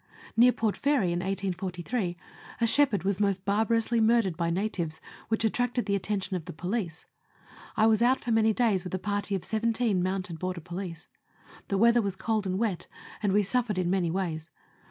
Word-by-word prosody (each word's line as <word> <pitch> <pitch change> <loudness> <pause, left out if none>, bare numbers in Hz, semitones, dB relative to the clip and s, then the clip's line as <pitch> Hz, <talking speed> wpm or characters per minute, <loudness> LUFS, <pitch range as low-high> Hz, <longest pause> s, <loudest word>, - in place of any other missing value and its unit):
Near 245 +2 +7
Port 220 -4 -1
Fairy, 275 -11 +2
in 175 - -1
1843, 185 +1 -3 0.4
a 235 - +3
shepherd 235 -3 +3
was 195 0 0
most 200 -2 +1
barbarously 225 +3 +2
murdered 220 -5 +3
by 170 0 -1
natives, 170 -4 -2 0.3
which 225 0 0
attracted 245 +2 0
the 200 - +1
attention 200 -1 -2
of 170 -4 -4
the - - -7
police. 180 0 -3 0.7
I 220 - +5
was 220 0 +4
out 250 +2 +4
for 240 - -4
many 225 0 +4
days 215 -5 +1
with 185 0 -4
a - - 0
party 205 +1 -2
of 180 -2 -4
seventeen 225 -3 +1
mounted 185 -2 -2
border 185 0 -3
police. 175 0 -7 0.6
The 195 - 0
weather 235 +3 +5
was 200 -3 -2
cold 215 0 -1
and 185 0 -1
wet, 210 -5 -1 0.3
and 205 -2 +1
we 205 +2 +3
suffered 225 0 0
in 180 -1 0
many 185 -3 +1
ways. 165 -3 -3
200 Hz, 185 wpm, -28 LUFS, 180-225 Hz, 0.7 s, Near